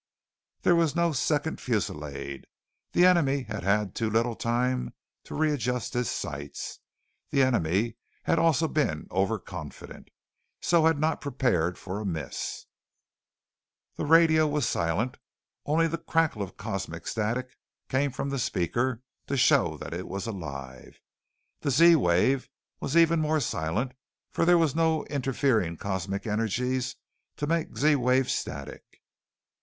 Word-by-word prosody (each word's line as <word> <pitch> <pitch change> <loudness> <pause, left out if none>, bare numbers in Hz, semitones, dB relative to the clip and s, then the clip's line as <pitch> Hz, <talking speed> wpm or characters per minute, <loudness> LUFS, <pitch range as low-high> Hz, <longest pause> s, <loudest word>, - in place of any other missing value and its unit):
There 175 - +5
was 165 -3 +2
no 170 0 +2
second 150 +2 0
fullisade. 75 - -3 0.5
The 175 - +5
enemy 145 -7 +4
had 105 -3 -5
had 100 +1 +1
too 115 -2 -1
little 115 +2 +1
time 125 +2 -1 0.3
to - - -7
readjust 130 -6 0
his 120 -1 0
sights. 70 +1 -5 0.5
The 135 - +3
enemy 115 -1 +1 0.3
had 165 - +2
also 165 -1 +3
been 140 - -1
overconfident, 95 -5 -4 0.5
so 170 -2 +3
had 165 -2 +3
not 155 +2 0
prepared 115 - 0
for 95 +2 -5
a 105 - -5
miss. 80 -7 -4 1.3
The - - -3
radio 160 -1 +6
was 145 -4 0
silent. 85 +10 -1 0.5
Only 160 +3 +3
the 165 +1 -3
crackle 165 -8 +1
of 95 - -6
cosmic 95 -5 -5
static 120 +4 -2 0.3
came 140 +2 +1
from 135 +2 -3
the 140 - -1
speaker 120 +5 -1 0.2
to 140 - -1
show 125 - +4
that - - -7
it 90 +2 -5
was 100 0 -4
alive. 70 - -7 0.6
The - - -2
Z 165 +6 +7
wave 125 - +2 0.3
was 150 - -1
even 165 -1 +5
more 155 0 +2
silent 110 - -1 0.4
for - - +1
there 175 0 +6
was 160 -5 +2
no 160 -1 +1
interfering 130 - +1
cosmic 95 +1 -3
energies 125 +4 -1 0.4
to 145 - -2
make 165 +1 -1
Z 150 0 +4
wave 125 +1 +2
static. 70 +1 -4
125 Hz, 140 wpm, -27 LUFS, 95-150 Hz, 1.3 s, Z